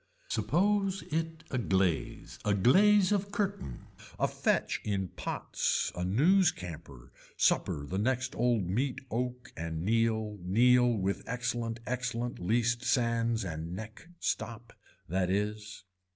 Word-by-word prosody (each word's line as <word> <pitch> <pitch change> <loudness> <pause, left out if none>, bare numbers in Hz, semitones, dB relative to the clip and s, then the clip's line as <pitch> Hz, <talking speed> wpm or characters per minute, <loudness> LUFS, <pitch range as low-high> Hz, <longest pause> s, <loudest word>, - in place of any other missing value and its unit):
Suppose 195 0 +1
it 160 0 -2
a 130 - 0
glaze 95 -6 -1
a 105 -1 +2
glaze 190 - +5
of 200 -1 0
curtain 200 - -3 0.3
a - - +3
fetch - - 0
in 95 -3 -1
pots - - -1
a 90 - -3
news 160 - +4
camper, 75 - -10 0.3
supper 70 - +2
the 95 +6 -3
next 130 +4 0
old 120 -4 +1
meat 125 +8 -1
oak 125 +2 -3
and 80 0 -4
kneel 110 -1 +1
kneel 120 +7 +4
with 95 0 -1
excellent 120 -1 -2
excellent 125 -1 -3
least 120 +5 +1
sands 115 -3 +1
and 80 0 -5
neck 110 - -9
stop. 115 0 -3 0.3
That 90 +1 0
is. 105 +2 -2
115 Hz, 125 wpm, -31 LUFS, 95-125 Hz, 0.3 s, glaze